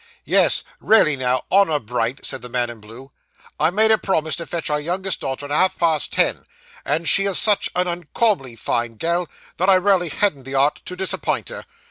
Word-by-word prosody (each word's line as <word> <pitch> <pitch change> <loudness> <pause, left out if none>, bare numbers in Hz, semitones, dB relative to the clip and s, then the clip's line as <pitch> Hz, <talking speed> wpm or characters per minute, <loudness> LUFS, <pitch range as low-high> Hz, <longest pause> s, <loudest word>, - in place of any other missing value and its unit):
'Yes; - - +3 0.2
raly 210 -9 +4
now, 130 -1 -1
honour 190 -6 +4
bright,' 120 +1 -3
said 135 - -3
the 125 - -9
man 120 -1 -1
in 115 - -12
blue. 115 +6 -13 0.5
'I - - +3
made 220 +5 +3
a 220 - +4
promese 160 -5 -1
to 170 - -6
fetch 170 -2 -3
our 150 - +1
youngest 185 +4 -2
daughter 135 +2 -4
at 145 - -9
half 185 +5 +2
past 160 -4 +1
ten, - - 0 0.4
and 165 +1 -1
she 195 - +5
is 195 -2 +2
such 210 -2 +2
an 180 0 0
uncauminly 175 - -1
fine 115 0 -3
gal, 170 +6 -1 0.3
that 185 +3 +1
I 190 - +6
raly 185 -2 +2
hadn't 150 -8 -1
the 135 +1 -6
'art 140 +2 +1
to 180 - -6
disappint 190 0 -2
her. - - -9
160 Hz, 200 wpm, -20 LUFS, 135-185 Hz, 0.5 s, I